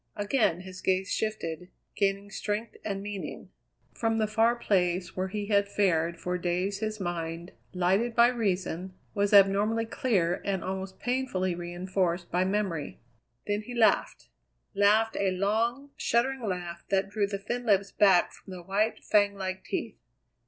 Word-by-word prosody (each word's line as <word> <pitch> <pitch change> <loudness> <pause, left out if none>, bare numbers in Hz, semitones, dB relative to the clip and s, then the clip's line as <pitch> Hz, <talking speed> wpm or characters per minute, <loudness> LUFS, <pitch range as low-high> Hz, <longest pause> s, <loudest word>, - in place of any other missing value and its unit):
Again 205 -4 +1
his 185 0 -10
gaze 190 +1 +1
shifted, 180 -6 -3 0.3
gaining 200 0 0
strength 210 +2 -3
and 195 -2 -3
meaning. 205 -2 -6 0.4
From 225 -1 0
the 220 - +2
far 225 +2 +3
place 180 -6 0
where 185 0 -1
he 205 +2 -4
had 200 -1 +2
fared 170 -5 +1
for 180 0 -2
days 180 +3 -1
his 215 -1 -3
mind, 170 -1 -4 0.2
lighted 195 +6 +1
by 235 0 +7
reason, 190 -5 -2 0.2
was 205 -1 +1
abnormally 205 +3 +5
clear 190 -8 0
and 195 -3 -1
almost 190 0 -4
painfully 245 -8 -1
reinforced 175 0 -2
by 180 +1 +2
memory. 190 -6 -2 0.5
Then 205 0 -1
he 245 +3 -8
laughed 225 -2 +2 0.4
laughed 215 +3 +3
a 195 - +2
long, 230 +8 0
shuddering 260 +3 +1
laugh 175 -2 -4
that 195 0 +1
drew 205 -1 +1
the 200 0 -3
thin 240 +5 -4
lips 200 -1 +3
back 195 -4 +4
from 190 - -12
the 180 -1 -8
white, 205 +5 0
fang 205 -1 +3
like 190 -1 -4
teeth. - - -4
200 Hz, 150 wpm, -28 LUFS, 180-215 Hz, 0.5 s, by